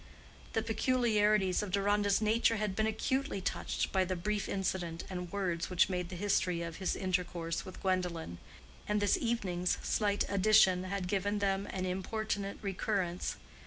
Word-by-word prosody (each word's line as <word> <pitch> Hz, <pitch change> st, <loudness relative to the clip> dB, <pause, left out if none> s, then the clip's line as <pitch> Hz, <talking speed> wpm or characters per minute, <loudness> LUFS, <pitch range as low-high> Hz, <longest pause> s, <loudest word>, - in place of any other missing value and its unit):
The 225 Hz, -, +1 dB
peculiarities 215 Hz, -5 st, +2 dB
of 210 Hz, -, -4 dB
Deronda's 200 Hz, +2 st, +2 dB
nature 225 Hz, +2 st, +3 dB
had 210 Hz, -3 st, -2 dB
been 215 Hz, +1 st, +1 dB
acutely 265 Hz, +2 st, -1 dB
touched 185 Hz, -, -2 dB
by 190 Hz, -1 st, +3 dB
the 185 Hz, 0 st, -2 dB
brief 205 Hz, +4 st, -2 dB
incident 180 Hz, -4 st, -2 dB
and 180 Hz, -2 st, -5 dB
words 180 Hz, -4 st, -1 dB
which 180 Hz, 0 st, +3 dB
made 180 Hz, -2 st, -2 dB
the 185 Hz, -, -6 dB
history 180 Hz, -2 st, +1 dB
of 165 Hz, -2 st, -6 dB
his 190 Hz, -, -1 dB
intercourse 175 Hz, -3 st, -2 dB
with 185 Hz, -, -9 dB
Gwendolen; 180 Hz, -, -1 dB, 0.5 s
and 210 Hz, 0 st, +1 dB
this 205 Hz, -1 st, +3 dB
evening's 185 Hz, -7 st, 0 dB
slight 205 Hz, -1 st, +1 dB
addition 195 Hz, -2 st, +4 dB
had 190 Hz, -1 st, -3 dB
given 205 Hz, +2 st, 0 dB
them 195 Hz, 0 st, 0 dB
an 185 Hz, -1 st, -3 dB
importunate 200 Hz, +2 st, -2 dB
recurrence. 190 Hz, -2 st, -1 dB
195 Hz, 155 wpm, -33 LUFS, 180-210 Hz, 0.5 s, addition